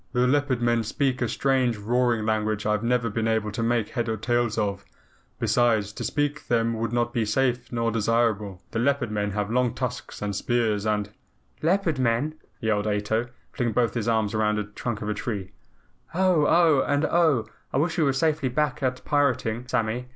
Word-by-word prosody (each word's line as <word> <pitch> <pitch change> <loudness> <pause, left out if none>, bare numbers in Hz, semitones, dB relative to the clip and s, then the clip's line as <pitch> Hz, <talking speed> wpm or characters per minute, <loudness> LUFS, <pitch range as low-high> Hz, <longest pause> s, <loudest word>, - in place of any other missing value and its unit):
"The 125 0 +3
Leopard 135 -2 +1
Men 120 -1 +2
speak 130 +3 -1
a 120 - +2
strange 130 -3 +1
roaring 120 +1 +1
language 110 -1 0
I 105 - +2
have 105 -1 +1
never 120 0 +1
been 115 +1 -1
able 110 -1 0
to 105 - -4
make 115 -2 +1
head 120 -2 -2
or 110 - -1
tail 120 +2 +1
of. 100 -2 -1 0.5
Besides, 110 -4 +2
to - - -6
speak 145 0 0
to - - -28
them 115 -1 +2
would 115 0 -2
not 120 0 0
be 115 - +1
safe 120 +3 0
nor 115 -1 0
desirable. 105 -3 0
The 115 - -2
Leopard 140 -2 +1
Men 105 -1 -1
have 105 0 -2
long 125 0 +1
tusks 125 -2 -4
and 100 -1 -2
spears 110 -2 0
and 105 -1 -1 0.3
" - - -38
"Leopard 165 -3 +1
Men!" 130 +5 +1 0.3
yelled 110 -1 0
Ato, 105 +3 0 0.2
flinging 120 -3 -1
both 120 -1 +1
arms 110 -2 +1
round 105 -1 +1
the 105 - 0
trunk 105 +1 -5
of - - -4
a - - +1
tree. 100 -3 -4 0.6
"Oh! 180 -5 +3
Oh! 160 -5 +4
and 145 +2 +2
OH! 160 -9 +3 0.3
I - - -1
wish 160 +4 +1
we - - +4
were 140 - +3
safely 150 -1 +1
back 150 +4 -1
at 130 -1 -2
pirating, 125 -5 0
Sammy. 120 +1 -1
120 Hz, 195 wpm, -25 LUFS, 110-130 Hz, 0.6 s, Oh